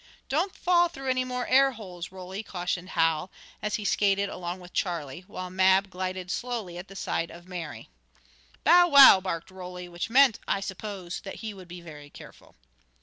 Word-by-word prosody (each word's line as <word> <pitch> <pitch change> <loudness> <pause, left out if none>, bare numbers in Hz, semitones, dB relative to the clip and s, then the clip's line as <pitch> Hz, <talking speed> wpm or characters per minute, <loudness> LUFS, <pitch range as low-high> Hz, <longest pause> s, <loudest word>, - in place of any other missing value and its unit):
"Don't 340 +7 0
fall 350 -1 +3
through 270 -5 -3
any 255 0 +1
more 250 -1 -3
air 270 +1 +4
holes, 180 -7 -8
Roly!" 190 +1 -7
cautioned 180 -2 -4
Hal, 165 +1 +2 0.3
as 210 - -1
he 210 - -4
skated 200 0 +2
along 175 0 -5
with 180 0 -13
Charlie, 170 -3 -3
while 185 -3 -7
Mab 190 +1 +3
glided 185 0 -4
slowly 225 -8 -4
at 180 - -9
the 195 - -13
side 165 -3 -2
of 175 +1 -13
Mary. 175 -4 -7 0.8
"Bow 350 +2 +7
wow!" 275 - +10
barked 170 -2 -4
Roly, 180 -1 -8
which 175 +4 -5
meant, 260 -1 +5
I 195 - +1
suppose, 195 -2 -6
that 195 - -8
he 215 - -4
would 185 -3 -12
be 175 0 -9
very 150 -3 -11
careful. - - -15
190 Hz, 180 wpm, -27 LUFS, 175-225 Hz, 0.8 s, wow